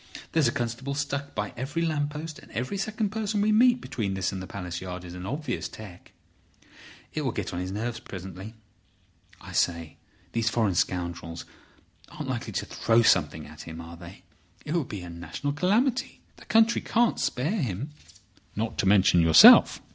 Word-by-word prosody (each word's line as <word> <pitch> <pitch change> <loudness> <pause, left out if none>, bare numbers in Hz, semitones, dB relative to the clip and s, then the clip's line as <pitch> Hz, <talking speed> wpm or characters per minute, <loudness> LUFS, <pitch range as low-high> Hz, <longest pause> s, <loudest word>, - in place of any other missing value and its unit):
There's 160 -5 +3
a - - +2
constable 120 +2 -3
stuck 140 0 -3
by - - -3
every 140 +7 -2
lamp 150 -3 0
post, 155 +1 -7
and - - -17
every 125 - -3
second 210 +1 -2
person 215 -1 -1
we 210 +1 +3
meet 245 +3 +5
between 100 -5 -3
this 95 0 -1
and 95 -1 -6
Palace 90 -3 -5
Yard 90 -1 -6
is 85 - -9
an 90 +1 -7
obvious 140 +2 -3
'tec.' 100 -5 -12 1.0
It - - -2
will - - -1
get - - -4
on 85 - -3
his 90 +1 -4
nerves 115 +3 -3
presently. 95 +3 -9 0.9
I - - -10
say, 85 -2 -1 0.3
these 115 -1 +1
foreign 110 -4 +1
scoundrels 85 -1 -2 0.6
aren't - - -7
likely - - -3
to - - -2
throw 115 +1 +2
something 75 -7 +2
at 75 +1 -12
him—are 85 +1 -8
they? 85 +2 -12 0.4
It 150 - -3
would 170 -6 -1
be 100 -3 -5
a 90 - -8
national 85 - -4
calamity. 240 - +1 0.2
The - - -15
country 225 +1 +4
can't 235 0 +1
spare 140 - -1
him." 125 - -3 0.6
"Not 110 +2 -3
to - - +2
mention 95 -3 +5
yourself. 80 -1 +8
115 Hz, 175 wpm, -27 LUFS, -, 1.0 s, yourself